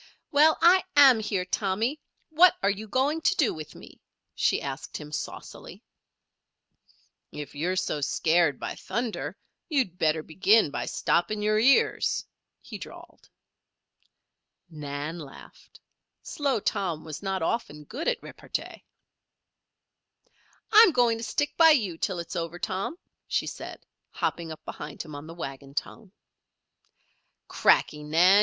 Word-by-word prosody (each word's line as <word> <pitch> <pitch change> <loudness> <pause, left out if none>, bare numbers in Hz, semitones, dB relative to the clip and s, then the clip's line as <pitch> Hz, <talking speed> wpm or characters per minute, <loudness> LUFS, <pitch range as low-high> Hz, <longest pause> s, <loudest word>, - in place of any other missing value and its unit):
"Well, 305 +2 +5
I 365 +2 +7
am 270 -5 +8
here, 200 -4 -2
Tommy; 215 +9 -1 0.3
what 345 +3 +6
are 200 - +4
you 210 +2 -6
going 275 +8 0
to 365 - +2
do 295 -9 +2
with 155 -1 -9
me?" - - -14 0.3
she - - +1
asked 135 -1 -6
him, 150 -1 -10
saucily. 150 -1 -7 1.5
"If 150 -1 -8
you're 170 +6 -1
so 150 -5 -1
scared 160 +1 +2
by - - -4
thunder 235 -2 -4 0.3
you'd 255 - 0
better 155 0 +1
begin 195 +2 +3
by - - -4
stopping 210 +5 0
your 215 0 +2
ears," 265 +5 +3 0.4
he - - -9
drawled. - - -12 1.4
Nan 150 +2 -5
laughed. 145 -4 -13 0.4
Slow 280 -5 -1
Tom 175 -6 -2
was 155 -2 -7
not 195 -3 -2
often 160 -7 -2
good 265 - -6
at 485 -2 0
repartee. - - -7 1.9
"I'm 440 -2 +8
going 235 -3 +3
to - - -6
stick 290 +5 -1
by 325 -1 +8
you 195 -8 -3
till 200 -6 -1
it's 170 +2 -6
over, 170 0 -3
Tom," 195 - -3 0.3
she - - 0
said, - - -8 0.2
hopping 165 -2 -3
up 155 - -10
behind - - -7
him 155 -2 -11
on 145 +2 -8
the 165 - -9
wagon 140 -3 -8
tongue. 200 +4 -5 1.4
"Cracky, 150 - +2
Nan! 165 +5 +4
190 Hz, 135 wpm, -27 LUFS, 155-250 Hz, 1.9 s, am